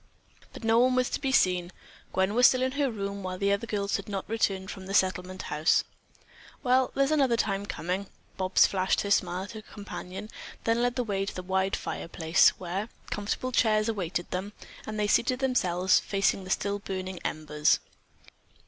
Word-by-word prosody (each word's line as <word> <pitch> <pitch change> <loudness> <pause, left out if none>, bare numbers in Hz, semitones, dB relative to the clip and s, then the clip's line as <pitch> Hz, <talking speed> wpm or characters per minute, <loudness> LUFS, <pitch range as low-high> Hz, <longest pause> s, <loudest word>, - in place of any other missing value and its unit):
But - - -11
no 225 +1 +4
one 255 +1 +4
was 255 -1 +1
to - - -2
be 270 -2 0
seen. 180 -7 +2 0.4
Gwen 190 +2 +1
was 245 +2 +7
still 255 0 +2
in 260 - +1
her 280 0 0
room, 200 -3 -4
while 185 -1 -4
the 200 +1 +1
other 200 +3 0
girls 200 -2 -1
had 200 +1 -9
not 195 -2 -4
returned 195 -3 -1
from 190 -1 -9
the 195 - -2
Settlement 185 -1 +1
House. 155 +3 +3 0.8
"Well, 255 0 +3
there's 275 +1 +2
another 270 -6 +3
time 200 -2 -1
coming." 185 +3 -3 0.3
Bobs 185 0 +4
flashed 190 +1 0
a 200 - -2
smile 180 -1 +1
at 200 - -8
her 220 -1 -8
companion, 205 -1 -8 0.3
then 230 +1 +1
led 245 0 +1
the 250 - 0
way 195 -3 -2
to - - -5
the 185 - -5
wide 190 +1 0
fireplace, 165 0 +2
where 190 +5 -4 0.2
comfortable 210 +5 -2
chairs 215 -3 +3
awaited 180 -5 -3
them, 190 +3 -3 0.3
and 215 0 -4
they 210 - +2
seated 245 +4 +2
themselves 190 -9 +2
facing 195 -1 0
the - - -9
still 200 +1 0
burning 185 -2 -5
embers. 150 -1 +1
200 Hz, 185 wpm, -28 LUFS, 185-225 Hz, 0.8 s, was